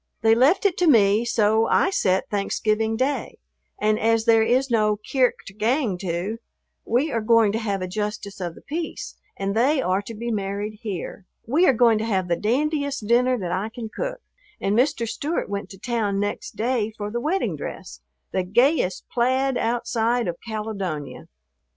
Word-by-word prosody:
They 225 Hz, 0 st, +5 dB
left 270 Hz, -, +3 dB
it 380 Hz, -4 st, +2 dB
to 355 Hz, -, +3 dB
me, 215 Hz, -4 st, +5 dB
so 220 Hz, -1 st, +2 dB
I 380 Hz, -, +3 dB
set 190 Hz, -, +1 dB
Thanksgiving 215 Hz, +2 st, 0 dB
Day, 270 Hz, +3 st, -1 dB, 0.4 s
and 215 Hz, 0 st, +2 dB
as 225 Hz, 0 st, +2 dB
there 225 Hz, -1 st, +5 dB
is 255 Hz, +3 st, +2 dB
no 215 Hz, -2 st, +2 dB
"kirk 250 Hz, +4 st, +1 dB
to 195 Hz, -, -10 dB
gang 225 Hz, +1 st, 0 dB
to," 185 Hz, +5 st, -3 dB, 0.5 s
we 265 Hz, +7 st, +1 dB
are 230 Hz, -, 0 dB
going 225 Hz, -1 st, +4 dB
to 220 Hz, -, -1 dB
have 200 Hz, -4 st, -2 dB
a -, -, -3 dB
justice 205 Hz, 0 st, -4 dB
of 170 Hz, -2 st, -4 dB
the -, -, -15 dB
peace 320 Hz, +3 st, -5 dB, 0.2 s
and 195 Hz, 0 st, -2 dB
they 270 Hz, +6 st, +3 dB
are 185 Hz, -4 st, +1 dB
to 225 Hz, +2 st, -9 dB
be 235 Hz, +2 st, -4 dB
married 205 Hz, 0 st, -3 dB
here. 195 Hz, -2 st, -6 dB, 0.2 s
We 310 Hz, +10 st, +3 dB
are 270 Hz, -, +6 dB
going 230 Hz, -2 st, +4 dB
to 220 Hz, -, -2 dB
have 190 Hz, -5 st, -1 dB
the 170 Hz, -, +3 dB
dandiest 280 Hz, -, -1 dB
dinner 250 Hz, +3 st, +3 dB
that 180 Hz, -5 st, -4 dB
I 190 Hz, +5 st, -1 dB
can 225 Hz, -1 st, -7 dB
cook, -, -, -5 dB, 0.4 s
and 200 Hz, +1 st, 0 dB
Mr. 250 Hz, -1 st, +1 dB
Stewart 285 Hz, +9 st, -2 dB
went 200 Hz, 0 st, -4 dB
to 195 Hz, -, -11 dB
town 210 Hz, -3 st, -1 dB
next 205 Hz, +1 st, -3 dB
day 225 Hz, 0 st, 0 dB
for 205 Hz, 0 st, -4 dB
the 240 Hz, +1 st, -2 dB
wedding 365 Hz, +8 st, 0 dB
dress, -, -, -8 dB, 0.3 s
the 190 Hz, -, 0 dB
gayest 215 Hz, -, +1 dB
plaid 260 Hz, +2 st, +1 dB
outside 235 Hz, -1 st, 0 dB
of 170 Hz, -, -2 dB
Caledonia. 200 Hz, -, -5 dB
225 Hz, 180 wpm, -23 LUFS, 205-250 Hz, 0.5 s, are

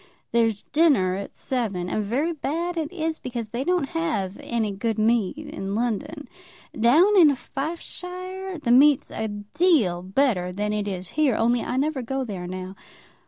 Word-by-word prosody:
There's 225 Hz, -3 st, +1 dB
dinner 285 Hz, -, +4 dB
at 200 Hz, +1 st, -6 dB
seven; 210 Hz, -9 st, -2 dB
and 210 Hz, +3 st, -1 dB
very 275 Hz, +11 st, 0 dB
bad 335 Hz, +4 st, -2 dB
it 320 Hz, -2 st, -2 dB
is, 325 Hz, -3 st, -2 dB
because 235 Hz, -3 st, -5 dB
they 240 Hz, +4 st, -3 dB
don't 355 Hz, -3 st, 0 dB
have 270 Hz, -, -2 dB
any 225 Hz, -3 st, -1 dB
good 220 Hz, +3 st, -2 dB
meat 220 Hz, +1 st, +2 dB
in 200 Hz, -10 st, -5 dB
London. 240 Hz, +5 st, -2 dB, 0.5 s
Down 310 Hz, -, +5 dB
in 315 Hz, -7 st, +7 dB
Fifeshire 360 Hz, +6 st, -6 dB
the 280 Hz, -6 st, -1 dB
meat's 275 Hz, +2 st, +5 dB
a 220 Hz, -, -3 dB
deal 210 Hz, -, +1 dB
better 190 Hz, -2 st, +1 dB
than 210 Hz, +3 st, -2 dB
it 210 Hz, -1 st, -2 dB
is 185 Hz, -2 st, -4 dB
here, 295 Hz, -6 st, +2 dB
only 235 Hz, +1 st, +2 dB
I 250 Hz, -, -3 dB
never 285 Hz, 0 st, 0 dB
go 265 Hz, +3 st, -2 dB
there 190 Hz, -7 st, -5 dB
now. 185 Hz, +1 st, -6 dB
240 Hz, 165 wpm, -24 LUFS, 205-310 Hz, 0.5 s, in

